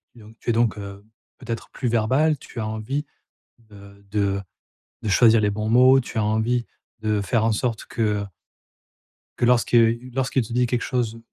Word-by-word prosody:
donc 110 -1 -15
et - - +2
donc, 115 -1 +1
heu, 100 0 -9 0.3
peut-être 115 -2 -6
plus 125 - -3
verbal, 130 +7 +2
tu 120 - -10
as 110 - -2
envie, 110 +7 -3 0.5
de 100 -3 -16
de 100 -1 0 0.6
de - - -3
choisir 110 +2 +5
les 105 - +2
bons 105 +1 -3
mots, 130 +3 +6
tu 120 - -6
as 105 - +1
envie 110 +3 0 0.3
de 110 -1 0
faire 110 +2 +1
en 115 - +2
sorte 115 +1 -2
que, 115 - -4 0.2
heu - - -6 1.1
que - - +1
lorsque 120 -1 +2 0.4
lorsqu'il 130 -1 0
te 115 - -8
dit 125 0 +2
quelque 120 -1 -1
chose, 115 -3 -2
115 Hz, 175 wpm, -23 LUFS, 105-125 Hz, 1.1 s, mots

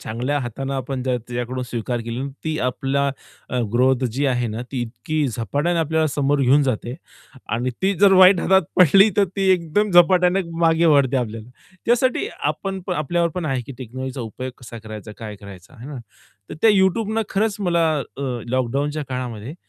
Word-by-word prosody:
चांगल्या 125 +6 -2
हाताने 135 +2 -4
आपण 130 0 -3
त्या 125 -1 +1
त्याच्याकडून 125 +2 -4
स्वीकार 120 0 -3
केले, 115 +2 -4 0.2
ती 155 -1 -2
आपला 135 +2 -1 0.4
अ, 125 - 0
ग्रोथ 130 +2 +3
जी 140 +4 0
आहे 125 -2 0
ना, 110 +2 -4
ती 130 - -2
इतकी 125 +6 -2
झपाट्याने 140 - -1
आपल्याला 160 0 +1
समोर 145 0 0
घेऊन 135 +3 +4
जाते. 125 -2 -2 0.5
आणि 120 +3 -1
ती 195 +1 +2
जर 200 -1 +7
वाईट 185 -1 +7
हातात 190 0 +4
पडली 190 +4 +7
तर 200 - +5
ती 195 -1 +1
एकदम 185 +4 0
झपाट्याने 180 +1 +5 0.2
मागे 165 0 +3
ओढते 135 -2 +3
आपल्याला. 115 -1 -4 0.4
त्यासाठी 245 +2 +2
आपण 190 +6 -2
पण 180 - -1
आपल्यावर 170 +3 0
पण 180 -3 -3
आहे 135 -3 -1
की 140 - -7
टेक्नॉलॉजीचा 130 +1 -6
उपयोग 125 +3 -6
कसा 115 -1 -9
करायचा, 110 -1 -9
काय 105 -3 -7
करायचा, 100 +3 -13
आहे 120 +3 -10
ना? 145 - -7 0.5
तर - - -5
त्या 225 - +7
YouTubeनं 210 +3 +2
खरंच 205 +1 0
मला 170 -4 +2 0.3
अ, 140 - -5 0.3
लॉकडाउनच्या 140 +5 -1
काळामध्ये, 125 0 -5
135 Hz, 175 wpm, -21 LUFS, 120-175 Hz, 0.5 s, जर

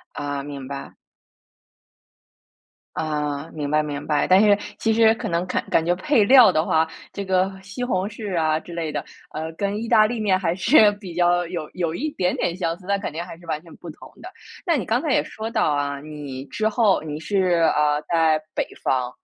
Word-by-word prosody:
啊， 145 -1 -3
明 140 -2 -7
白。 140 -1 -7 2.0
啊， 150 -1 -2
明 145 -2 -3
白 155 0 +3
明 145 -1 -5
白。 150 -1 +1
但 185 +2 +6
是 205 -1 +5 0.2
其 225 - +1
实 225 0 +5
可 - - -5
能 170 +1 -1
看 - - -2
感 165 - +3
觉 175 - +2
配 215 +3 +2
料 245 -4 +7
的 155 +1 +1
话， 160 0 +2 0.3
这 200 - -5
个 190 0 +1
西 205 +6 -7
红 195 -6 0
柿 205 -4 -4
啊 155 -1 +1
之 175 - -12
类 160 -3 -3
的， - - -2 0.3
呃， 160 +1 -4
跟 200 +5 -3
意 230 - -5
大 215 -2 +6
利 230 0 -3
面 195 -3 +2
还 175 -2 0
是 210 +2 +5
比 195 -5 -9
较 175 0 +2
有 165 -3 -5
有 170 -3 -2
一 300 - -2
点 185 -9 -1
点 170 - -1
相 165 -3 -2
似， 185 - -18
但 200 0 0
肯 - - -4
定 170 +2 -4
还 170 - -10
是 175 - -16
完 155 -2 -2
全 165 - -15
不 175 - -11
同 - - -13
的。 - - -8 0.4
那 335 -3 +3
你 220 - -2
刚 235 +6 +1
才 305 - -2
也 - - +2
说 220 +1 -6
到 220 -9 +1
啊， 145 -1 -1
你 145 -3 -7
之 215 +7 -1
后 210 -6 +2
你 150 -1 -5
是 180 -1 +1
啊， 150 0 +2
在 160 -1 +2 0.2
北 - - -1 0.2
方 125 -1 0
175 Hz, 230 characters per minute, -23 LUFS, 155-205 Hz, 2.0 s, 料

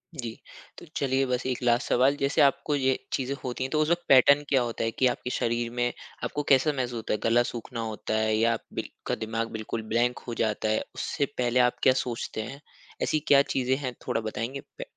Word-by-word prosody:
जी। 120 -5 -5 0.4
तो - - -10
चलिए 135 0 +1
बस 125 -1 -1
एक 130 -1 -2
लास्ट 120 0 +2
सवाल, 130 +3 +4
जैसे 140 0 +1
आपको 145 +1 +3
ये 130 -2 +2 0.2
चीज़ें 135 +1 -1
होती 125 0 -3
हैं 130 - -4
तो 155 - +1
उस 155 - +1
वक़्त 175 0 +1
पैटर्न 140 +2 +7
क्या 135 -2 +4
होता 120 -2 -2
है? 115 - 0
कि 130 - +2
आपके 125 - -2
शरीर 120 -1 -1
में 120 0 0 0.3
आपको 145 - -2
कैसा 135 +3 +5
महसूस 125 -3 -2
होता 110 - -2
है, - - +1
गला 120 +1 +4
सूखना 120 0 -6
होता 110 -1 -4
है? 110 0 +2
या 115 +1 +3
अप 115 - -5
बिल - - -4 0.2
का - - +1
दिमाग़ 115 +1 -3
बिल्कुल 110 +1 -4
ब्लैंक 120 +1 +2
हो 120 - -3
जाता 110 0 -1
है 110 - +1
उससे 145 - -1
पहले 125 0 +2
आप 125 -1 +3
क्या 130 - +6
सोचते 115 -2 -4
हैं 135 +6 -8 0.4
ऐसी 155 - +1
क्या 140 -1 +7
चीज़ें 130 0 +2
हैं 130 -3 -4
थोड़ा - - 0
बताएँगी? 115 +5 -4 0.2
पे - - -4
125 Hz, 225 wpm, -27 LUFS, 115-135 Hz, 0.4 s, पैटर्न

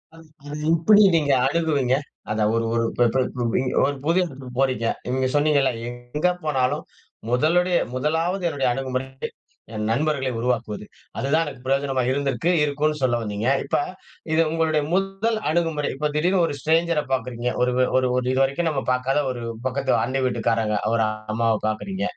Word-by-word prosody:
அது 165 0 -15 0.2
அது 150 +1 -5
எப்படி 205 +6 +6
நீங்க 145 -3 +1 0.2
அணுகுவீங்க? 145 -5 +1 0.4
அத 110 0 -1
ஒரு 115 0 0
ஒரு 115 0 +1
ப்ப 120 -1 +5
பரு 130 -1 +3 0.6
1 145 - -2
புது 170 +3 +3
எடத்துக்கு 135 -6 -8
போறீங்க. 130 -4 +1 0.2
நீங்க 130 +1 0
சொன்னீங்கல்ல, 145 -3 +3 0.2
எங்க 120 +7 -2 0.2
போனாலும், 130 -4 0 0.5
முதலுடைய 170 +8 +3 0.2
முதலாவது 165 +7 0
என்னுடைய 140 -4 -1
அணுகுமுறை 130 0 -3 0.7
என் 105 0 -3
நண்பர்களை 135 +1 0
உருவாக்குவது. 115 -4 -2 0.3
அதுதான் 155 +5 +1
எனக்கு 135 -3 -9
பிரயோஜனமா 135 -1 +1
இருந்திருக்கு 140 +5 0
இருக்குன்னு 150 +1 0
சொல்ல 125 -2 +2
வந்தீங்க. 105 +2 -3 0.2
இப்போ - - +1 0.5
இது 165 - +4
உங்களுடைய 160 -2 +1
முதல் 195 +4 0
அணுகுமுறை. 160 -3 0
இப்போ 150 +2 -1
திடீர்னு 175 +3 +2
ஒரு 145 - -4
ஸ்ட்ரேஞ்சர 165 +1 +2
பாக்குறீங்க. 125 -1 -2 0.2
ஒரு 125 0 +1 0.2
ஒரு 130 -1 +2
ஒரு 125 - 0
இது 130 - +1
வரைக்கும் 150 +5 0
நம்ம 135 -3 -1
பாக்காத 130 +3 +1
ஒரு 120 -2 -6 0.2
பக்கத்து 130 +1 0
அண்டை 130 +2 -1
வீட்டுக்காரங்க, 115 -3 0 0.2
ஒரு 115 -1 +3 0.3
அம்மாவை 115 -1 +2
பாக்குறீங்க. 180 - -3
135 Hz, 150 wpm, -23 LUFS, 125-160 Hz, 0.7 s, எப்படி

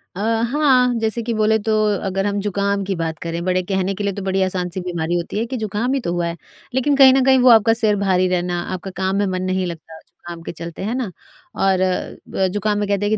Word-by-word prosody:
अ, - - -6 0.3
हाँ 260 -4 +3
जैसे 225 +1 -1
कि 235 0 -2
बोले 220 0 +2
तो 220 +1 -1 0.3
अगर 195 +1 -1
हम 205 0 -1
ज़ुकाम 200 0 -1
की 195 -1 -2
बात 165 -2 -3
करें, 170 0 -4
बड़े 185 0 +1
कहने 190 0 0
के 205 - -4
लिए 200 -1 -1
तो 200 - -6
बड़ी 190 0 0
आसान 180 -1 -2
सी 180 +2 -4
बीमारी 175 -1 -2
होती 175 +4 -4
है 230 - 0
कि 255 +1 -4
ज़ुकाम 220 +4 -2
ही 275 - +1
तो 170 -8 -3
हुआ 175 -1 -1
है, 170 0 -5 0.4
लेकिन 275 +2 +2
कहीं 265 -1 +8
न 265 -1 +3
कहीं 265 -1 +5
वो 250 - +6
आपका 225 -1 +6
सिर 220 -3 +2
भारी 185 -2 +2
रहना, 175 -1 -1
आपका 190 +1 -6
काम 190 +1 0
में 205 - +2
मन 185 -1 -2
नहीं 185 0 -1
लगता 165 -1 -8
जुकाम 170 -1 -12
के - - -5
चलते, 170 +1 -8
हैं 225 +5 -2
ना? 240 -8 -3 0.4
और 190 -1 +2
अ, 185 +1 -2
ज़ुकाम 205 +2 -1
में 205 - -1
कहते 200 0 0
हैं - - +1
195 Hz, 250 wpm, -20 LUFS, 180-220 Hz, 0.4 s, कहीं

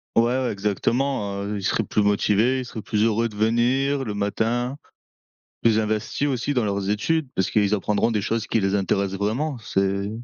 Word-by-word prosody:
Ouais, 115 - +5
ouais, 125 +1 0
exactement, 105 +1 -1
heu, 105 +1 -3
ils - - -8
seraient - - +1
plus 105 - 0
motivés, 105 +5 +2
ils - - -6
seraient 115 -2 -7
plus 105 +1 0
heureux 115 +1 +2
de 105 - -13
venir 125 +6 +1
le 105 - -4
matin, 115 +5 -1 0.9
plus 110 -1 +4
investis 110 +6 -1
aussi 135 +2 -1
dans 125 - +1
leurs 100 -1 -1
études 150 +9 0
parce 95 - 0
qu'ils 105 -1 +3
apprendront 105 +2 +1
des 105 -2 0
choses 115 +2 -2
qui 115 - +1
les 95 0 0
intéressent 95 0 0
vraiment, 125 +8 -1
c'est 100 -1 -1
110 Hz, 190 wpm, -23 LUFS, 100-120 Hz, 0.9 s, Ouais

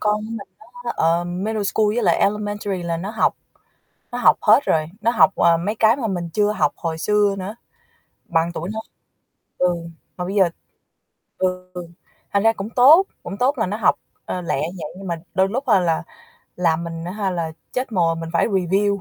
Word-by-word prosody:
con 210 0 +2
của 215 +1 -7
mình 225 -3 -6 0.4
nó, - - -1
ờm, 175 +3 0
middle 220 -1 -1
school 215 +2 +1
với 240 - 0
lại 170 -3 +4
elementary 205 -2 -1
là 170 -1 -2
nó 185 +5 -5
học - - +1 0.8
nó 245 - -3
học 245 - +5
hết 215 +4 +6
rồi, 155 -1 +2
nó 230 - +2
học, - - +4
à, 170 -1 +4
mấy 190 +6 -2
cái 225 +2 +4
mà 250 - -2
mình 175 -3 -3
chưa 210 0 +2
học - - +1
hồi 165 -2 -3
xưa 205 +2 +2
nữa. 195 +4 -6 0.7
Bằng 165 +1 +1
tuổi 175 +3 -4
nó 220 - -4 0.8
ừ, 180 - +3 0.5
mà 180 - -3
bây 195 +3 -4
giờ 190 -4 +4 0.9
ừ, 185 0 -1 0.7
thành 200 0 +2
ra 225 0 +5
cũng 205 -1 -6
tốt, 280 - +7 0.2
cũng 195 +3 -6
tốt 265 +5 +1
là 225 - +1
nó 205 +3 -3
học, 215 - +3 0.3
ờ, 180 - -3
lẹ 170 -3 -1
như 170 +5 -4
vậy - - -8
nhưng 195 0 -8
mà 170 - -1 0.2
đôi 190 +1 +2
lúc 255 +7 -2
ha 210 -5 +5
là 165 -3 0 0.5
làm 170 -2 +1
mình 165 -1 -6
á 175 - -4
ha, 200 -1 -2
là 165 -3 -2 0.2
chết 255 -1 -2
mồ 170 -5 +2
mình 165 0 -6
phải 170 - +3
review 200 0 +1
195 Hz, 210 wpm, -21 LUFS, 170-215 Hz, 0.9 s, tốt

